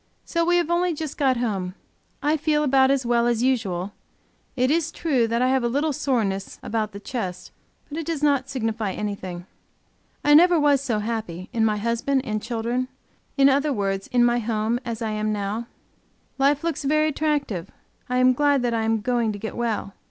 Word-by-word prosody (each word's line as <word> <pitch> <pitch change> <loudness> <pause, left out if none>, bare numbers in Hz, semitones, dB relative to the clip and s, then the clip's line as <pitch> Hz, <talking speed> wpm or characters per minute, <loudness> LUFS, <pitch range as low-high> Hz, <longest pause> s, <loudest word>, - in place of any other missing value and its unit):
So 335 -1 0
we 350 +1 +3
have 345 -1 0
only 345 -1 +1
just 305 -1 -5
got 265 -3 +2
home. 195 -6 -2 0.5
I 300 +2 +3
feel 300 0 +1
about 265 -2 +4
as 270 -2 +1
well 235 0 +2
as 240 0 +1
usual; 200 -7 0 0.6
it 255 +1 +2
is 325 0 +1
true 270 -9 +1
I 240 +2 +2
have 265 -1 +2
a - - +2
little 285 +5 0
soreness 215 -8 -1
a - - -7
bout 215 -1 -1
the 200 - -8
chest, 195 -6 -5 0.4
but 305 +2 -5
it 325 - -4
does 320 -3 -2
not 280 -3 +2
signify 225 -6 -2
anything. 185 -4 -5 0.8
I 295 - +6
never 345 +2 +7
was 290 -2 +3
so 245 -6 -1
happy, 210 -5 -4
in 230 -2 +1
my 215 -1 +1
husband 235 +5 0
and 215 -1 -2
children, 235 +2 -2 0.5
in 275 0 +6
other 280 +2 +3
words 195 -4 -1
in 245 -1 +3
my 240 0 +2
home, 225 +1 -1
as 235 -1 -4
I 220 - -1
am 215 0 -1
now. 210 +3 -3 0.7
Life 280 +2 +3
looks 325 -3 -2
very 305 +2 +2
attractive. 285 - -1 0.4
I 250 - 0
am 255 0 +5
glad 285 0 +2
that 240 -1 0
I 225 - 0
am 225 -1 +1
going 235 0 +1
to - - -6
get 220 +2 -6
well. 225 -4 -2
240 Hz, 195 wpm, -24 LUFS, 215-285 Hz, 0.8 s, never